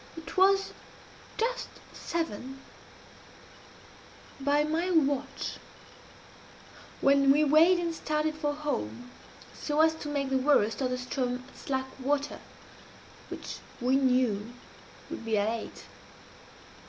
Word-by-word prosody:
It 325 Hz, -, -8 dB
was 390 Hz, +1 st, +4 dB, 0.6 s
just 465 Hz, +3 st, -1 dB, 0.2 s
seven, 270 Hz, -5 st, -4 dB, 1.8 s
by 285 Hz, +2 st, +2 dB
my 325 Hz, +4 st, 0 dB
watch, 285 Hz, -5 st, 0 dB, 1.4 s
when 275 Hz, 0 st, +5 dB
we 295 Hz, +2 st, +4 dB
weighed 315 Hz, +5 st, +6 dB
and 340 Hz, -1 st, -1 dB
started 305 Hz, -1 st, -1 dB
for 305 Hz, -1 st, -1 dB
home, 255 Hz, -4 st, -4 dB, 0.4 s
so 295 Hz, 0 st, -2 dB
as 320 Hz, 0 st, +5 dB
to 315 Hz, -2 st, -7 dB
make 280 Hz, -2 st, -1 dB
the 265 Hz, -, +3 dB
worst 255 Hz, -4 st, +3 dB
of 255 Hz, -, +1 dB
the 250 Hz, -, -1 dB
Ström 250 Hz, 0 st, -3 dB
at -, -, -18 dB
slack 265 Hz, -1 st, -2 dB
water, 285 Hz, +2 st, -1 dB, 0.9 s
which -, -, -6 dB, 0.2 s
we 250 Hz, +2 st, +2 dB
knew 250 Hz, -5 st, +2 dB, 0.6 s
would -, -, -5 dB
be 225 Hz, -1 st, 0 dB
at 205 Hz, +1 st, +2 dB
eight. 225 Hz, -1 st, -6 dB
280 Hz, 115 wpm, -29 LUFS, 255-310 Hz, 1.8 s, weighed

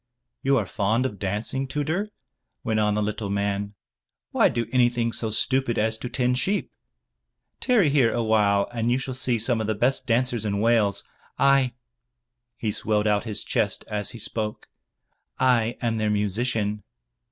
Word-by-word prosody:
"You 135 Hz, 0 st, +3 dB
are 110 Hz, -, 0 dB
fond 110 Hz, +6 st, 0 dB
of 105 Hz, -7 st, -4 dB
dancing, 105 Hz, +7 st, -2 dB
Tudur," 160 Hz, +10 st, -2 dB, 0.5 s
went 110 Hz, -1 st, 0 dB
on 105 Hz, -1 st, +2 dB
the 105 Hz, -, 0 dB
little 105 Hz, 0 st, -3 dB
man, 100 Hz, 0 st, -2 dB, 0.6 s
"Why -, -, +4 dB
do 115 Hz, 0 st, -2 dB
anything 120 Hz, -2 st, +2 dB
so 110 Hz, -, 0 dB
stupid 130 Hz, +2 st, +1 dB
as 110 Hz, +1 st, +2 dB
to 125 Hz, -, -5 dB
tend 125 Hz, 0 st, +1 dB
sheep? 200 Hz, +9 st, 0 dB, 0.9 s
Tarry 225 Hz, -, +3 dB
here 135 Hz, -5 st, +4 dB
awhile, 105 Hz, -3 st, +2 dB
and 115 Hz, 0 st, 0 dB
you 125 Hz, -, +3 dB
shall 130 Hz, 0 st, -4 dB
see 125 Hz, -1 st, 0 dB
some 115 Hz, +1 st, 0 dB
of 110 Hz, -, -3 dB
the 110 Hz, -, 0 dB
best 125 Hz, +6 st, +1 dB
dancers 120 Hz, -1 st, +1 dB
in 100 Hz, -2 st, -1 dB
Wales. 110 Hz, -3 st, +2 dB, 0.3 s
I" 140 Hz, -2 st, +3 dB, 0.4 s
— 120 Hz, 0 st, -36 dB
^he 105 Hz, -2 st, 0 dB
swelled 105 Hz, -1 st, 0 dB
out 105 Hz, 0 st, +1 dB
his 110 Hz, -3 st, -2 dB
chest -, -, -1 dB
as 105 Hz, -2 st, -1 dB
he 120 Hz, -, -7 dB
spoke, 110 Hz, -1 st, -4 dB, 0.7 s
"I 120 Hz, -2 st, +2 dB
am 115 Hz, -1 st, 0 dB
their 110 Hz, -1 st, 0 dB
musician." 105 Hz, +1 st, -1 dB
115 Hz, 165 wpm, -25 LUFS, 105-125 Hz, 0.9 s, Why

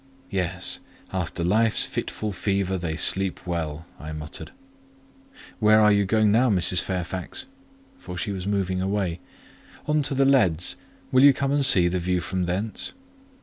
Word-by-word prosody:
"Yes—'after 90 Hz, -1 st, -3 dB
life's 110 Hz, +5 st, +3 dB
fitful 105 Hz, -1 st, -4 dB
fever 95 Hz, 0 st, -1 dB
they 85 Hz, -2 st, -3 dB
sleep 95 Hz, +3 st, +1 dB
well,'" 80 Hz, -3 st, -4 dB
I 75 Hz, 0 st, -7 dB
muttered. 75 Hz, 0 st, -6 dB, 1.1 s
"Where 110 Hz, -1 st, +5 dB
are 105 Hz, -1 st, +5 dB
you 100 Hz, -1 st, +3 dB
going 110 Hz, +1 st, +2 dB
now, 120 Hz, +4 st, +3 dB
Mrs. 90 Hz, -3 st, +3 dB
Fairfax?" 90 Hz, -, -4 dB, 0.5 s
for 90 Hz, -, -8 dB
she 100 Hz, -, -2 dB
was 95 Hz, -1 st, -5 dB
moving 95 Hz, -2 st, -1 dB
away. 95 Hz, -3 st, -2 dB, 0.7 s
"On 150 Hz, 0 st, +1 dB
to 140 Hz, -1 st, -1 dB
the 135 Hz, +1 st, +3 dB
leads; 90 Hz, -, +3 dB, 0.4 s
will 130 Hz, +1 st, +5 dB
you 140 Hz, -1 st, +8 dB
come 135 Hz, +1 st, -2 dB
and 145 Hz, 0 st, +2 dB
see 90 Hz, -9 st, +6 dB
the 90 Hz, +1 st, -1 dB
view 90 Hz, +1 st, 0 dB
from 90 Hz, 0 st, -3 dB
thence?" 100 Hz, +5 st, -2 dB
95 Hz, 150 wpm, -24 LUFS, 90-110 Hz, 1.1 s, you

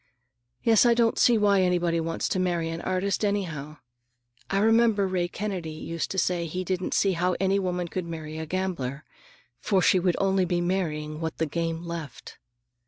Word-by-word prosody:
"Yes, 225 Hz, -2 st, +5 dB
I 240 Hz, -1 st, +4 dB
don't 230 Hz, -1 st, +2 dB
see 240 Hz, -2 st, +5 dB
why 200 Hz, -2 st, +4 dB
anybody 175 Hz, -2 st, +1 dB
wants 165 Hz, 0 st, -2 dB
to 185 Hz, -, 0 dB
marry 175 Hz, -3 st, 0 dB
an 165 Hz, +1 st, -5 dB
artist, 185 Hz, +3 st, -1 dB
anyhow. 165 Hz, -8 st, -2 dB, 0.7 s
I 195 Hz, -, 0 dB
remember 225 Hz, -1 st, +4 dB
Ray 180 Hz, -2 st, 0 dB
Kennedy 185 Hz, -3 st, -4 dB
used 165 Hz, +1 st, -4 dB
to 190 Hz, -, -5 dB
say 175 Hz, -2 st, 0 dB
he 180 Hz, +4 st, -3 dB
didn't 185 Hz, 0 st, -2 dB
see 195 Hz, -, +3 dB
how 180 Hz, 0 st, 0 dB
any 195 Hz, +1 st, +2 dB
woman 180 Hz, -2 st, -2 dB
could 180 Hz, +1 st, -4 dB
marry 160 Hz, -1 st, -6 dB
a 160 Hz, -, -5 dB
gambler, 155 Hz, -7 st, -3 dB, 0.6 s
for 195 Hz, -, +1 dB
she 185 Hz, 0 st, +4 dB
would 180 Hz, -1 st, +1 dB
only 195 Hz, -1 st, +2 dB
be 175 Hz, 0 st, 0 dB
marrying 155 Hz, -4 st, -2 dB
what 160 Hz, -1 st, -3 dB
the 160 Hz, -, +1 dB
game 165 Hz, +2 st, -3 dB
left." 165 Hz, -6 st, -7 dB
180 Hz, 180 wpm, -26 LUFS, 165-195 Hz, 0.7 s, Yes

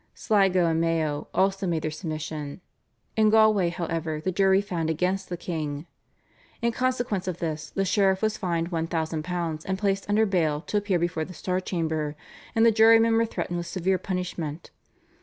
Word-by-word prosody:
Sligo 190 Hz, -4 st, +3 dB
and 165 Hz, 0 st, +1 dB
Mayo 160 Hz, -3 st, 0 dB
also 195 Hz, 0 st, +1 dB
made 165 Hz, -3 st, -1 dB
their 155 Hz, -, -1 dB
submission. 155 Hz, -2 st, -5 dB, 0.6 s
In 215 Hz, -1 st, +4 dB
Galway, 215 Hz, -4 st, +4 dB
however, 165 Hz, -2 st, -3 dB
the 185 Hz, +5 st, -2 dB
jury 190 Hz, +1 st, +4 dB
found 175 Hz, -5 st, -2 dB
against 180 Hz, +4 st, -1 dB
the 175 Hz, -, -3 dB
king. 155 Hz, -4 st, -4 dB, 0.7 s
In 235 Hz, 0 st, +1 dB
consequence 245 Hz, -6 st, -1 dB
of 180 Hz, -2 st, -2 dB
this 155 Hz, -3 st, -4 dB
the 195 Hz, -, -1 dB
sheriff 190 Hz, +1 st, +2 dB
was 215 Hz, 0 st, +1 dB
fined 170 Hz, -3 st, -2 dB
£1,000 165 Hz, 0 st, -2 dB
and 190 Hz, 0 st, -1 dB
placed 195 Hz, 0 st, -1 dB
under 215 Hz, +2 st, +4 dB
bail 160 Hz, -7 st, +1 dB
to 210 Hz, -, -2 dB
appear 205 Hz, -3 st, +1 dB
before 170 Hz, -2 st, -1 dB
the 185 Hz, -, -11 dB
Star 185 Hz, +2 st, -1 dB
Chamber, 160 Hz, -5 st, -2 dB, 0.4 s
and 225 Hz, 0 st, +5 dB
the 230 Hz, -, +7 dB
jurymen 225 Hz, +1 st, +6 dB
were 230 Hz, 0 st, +3 dB
threatened 175 Hz, -5 st, -3 dB
with 170 Hz, 0 st, -4 dB
severe 185 Hz, +1 st, 0 dB
punishment. 175 Hz, -4 st, -4 dB
180 Hz, 170 wpm, -26 LUFS, 160-195 Hz, 0.7 s, the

